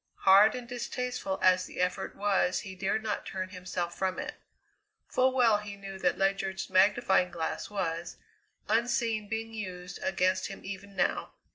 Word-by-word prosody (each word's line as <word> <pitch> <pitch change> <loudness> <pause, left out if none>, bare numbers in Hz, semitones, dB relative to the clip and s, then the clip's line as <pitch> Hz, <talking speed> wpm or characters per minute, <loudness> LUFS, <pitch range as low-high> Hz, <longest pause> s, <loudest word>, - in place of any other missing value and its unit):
Hard 200 +3 +7
and 250 -1 -6
distasteful 245 -4 -3
as 185 0 +4
the - - -9
effort 180 +1 -1
was 195 -2 +1
he 190 - -8
dared 195 +3 -1
not 215 -2 -2
turn 185 -1 -4
himself 180 -2 -4
from 190 -1 -1
it. - - -4 0.7
Full 260 +1 +3
well 235 -5 +4
he 205 -1 -7
knew 195 -1 -8
that 180 -1 +1
Ledyard's 195 0 -1
magnifying 190 -1 +4
glass 170 -2 -3
was, 170 -4 -3 0.5
unseen, 225 -1 +1
being 225 +1 -4
used 180 -4 -6
against 185 -9 +1
him 195 - -9
even 195 0 -8
now. 185 - 0
195 Hz, 155 wpm, -30 LUFS, 185-215 Hz, 0.7 s, Hard